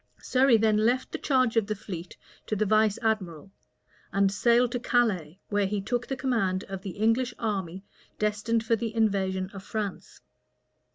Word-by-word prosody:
Surrey 260 Hz, -2 st, +4 dB
then 215 Hz, -1 st, +3 dB
left 240 Hz, +4 st, +1 dB
the -, -, -4 dB
charge 255 Hz, -4 st, +2 dB
of 220 Hz, -3 st, +2 dB
the 215 Hz, -, -2 dB
fleet 180 Hz, -4 st, -8 dB, 0.3 s
to 215 Hz, -, -1 dB
the 215 Hz, +1 st, +1 dB
vice 215 Hz, 0 st, +3 dB
admiral; 195 Hz, -5 st, -2 dB, 0.6 s
and 195 Hz, 0 st, +2 dB
sailed 235 Hz, +3 st, +3 dB
to 245 Hz, -, -2 dB
Calais, 205 Hz, -10 st, 0 dB
where 205 Hz, -1 st, +1 dB
he 205 Hz, +1 st, -1 dB
took 240 Hz, +5 st, -2 dB
the 270 Hz, -, -3 dB
command 195 Hz, -9 st, 0 dB
of 195 Hz, -1 st, -7 dB
the 195 Hz, -2 st, -7 dB
English 230 Hz, +4 st, +1 dB
army 190 Hz, -4 st, -3 dB, 0.3 s
destined 215 Hz, +2 st, 0 dB
for 230 Hz, -, +3 dB
the 225 Hz, 0 st, -4 dB
invasion 190 Hz, -3 st, 0 dB
of 195 Hz, -, -8 dB
France. 205 Hz, -1 st, -5 dB
215 Hz, 170 wpm, -27 LUFS, 195-230 Hz, 0.6 s, Surrey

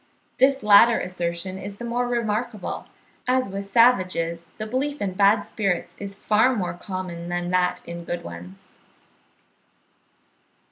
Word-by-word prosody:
This 270 Hz, -1 st, +4 dB
latter 210 Hz, +3 st, +7 dB
assertion 180 Hz, +1 st, -3 dB
is 200 Hz, +1 st, -7 dB
the 240 Hz, -, -6 dB
more 245 Hz, +1 st, -1 dB
remarkable, 230 Hz, -3 st, -2 dB, 0.4 s
as 255 Hz, -2 st, +2 dB
with 195 Hz, +1 st, -4 dB
savages 185 Hz, -7 st, +2 dB
the 215 Hz, -, -4 dB
belief 275 Hz, +6 st, -2 dB
in 195 Hz, -2 st, -2 dB
bad 200 Hz, +2 st, +4 dB
spirits 195 Hz, -5 st, -2 dB
is 200 Hz, 0 st, -6 dB
far 220 Hz, +5 st, +3 dB
more 180 Hz, -5 st, -2 dB
common 175 Hz, -2 st, -6 dB
than 175 Hz, 0 st, -2 dB
that 180 Hz, 0 st, +1 dB
in 170 Hz, 0 st, -7 dB
good 175 Hz, +1 st, -4 dB
ones. 90 Hz, +2 st, -11 dB
200 Hz, 135 wpm, -24 LUFS, 175-235 Hz, 0.4 s, latter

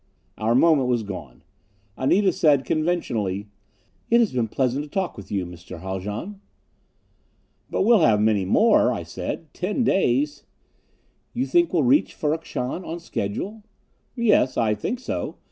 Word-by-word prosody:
Our 110 Hz, +2 st, +1 dB
moment 140 Hz, -2 st, +4 dB
was 120 Hz, -3 st, +1 dB
gone. 90 Hz, -, -8 dB, 0.5 s
Anita 190 Hz, +9 st, +2 dB
said 150 Hz, -7 st, +3 dB
conventionally, 110 Hz, -, -1 dB, 0.6 s
"It 235 Hz, -, +5 dB
has 230 Hz, -, +2 dB
been 120 Hz, -3 st, 0 dB
pleasant 130 Hz, +4 st, -1 dB
to 150 Hz, -, -11 dB
talk 190 Hz, +3 st, -2 dB
with 100 Hz, -, -11 dB
you, 95 Hz, -3 st, -1 dB
Mr. 90 Hz, -1 st, -10 dB
Haljan." 105 Hz, -, -5 dB, 1.3 s
"But -, -, 0 dB
we'll 225 Hz, +1 st, +5 dB
have 110 Hz, -10 st, +4 dB
many 105 Hz, -2 st, +2 dB
more," 95 Hz, -, +4 dB
I -, -, -3 dB
said. 160 Hz, -3 st, -6 dB
"Ten 205 Hz, +7 st, -1 dB
days 145 Hz, -, +1 dB, 0.5 s
" -, -, -42 dB
"You 255 Hz, +2 st, 0 dB
think 345 Hz, +2 st, +2 dB
we'll -, -, +2 dB
reach 270 Hz, +5 st, +3 dB
Ferrok 160 Hz, +2 st, -2 dB
Shahn 130 Hz, +9 st, -4 dB
on 170 Hz, 0 st, -5 dB
schedule?" 185 Hz, -, -4 dB, 0.5 s
"Yes. 210 Hz, -, +2 dB
I 110 Hz, -2 st, +2 dB
think 170 Hz, -, -3 dB
so.... 260 Hz, -, -4 dB
140 Hz, 150 wpm, -23 LUFS, -, 1.3 s, It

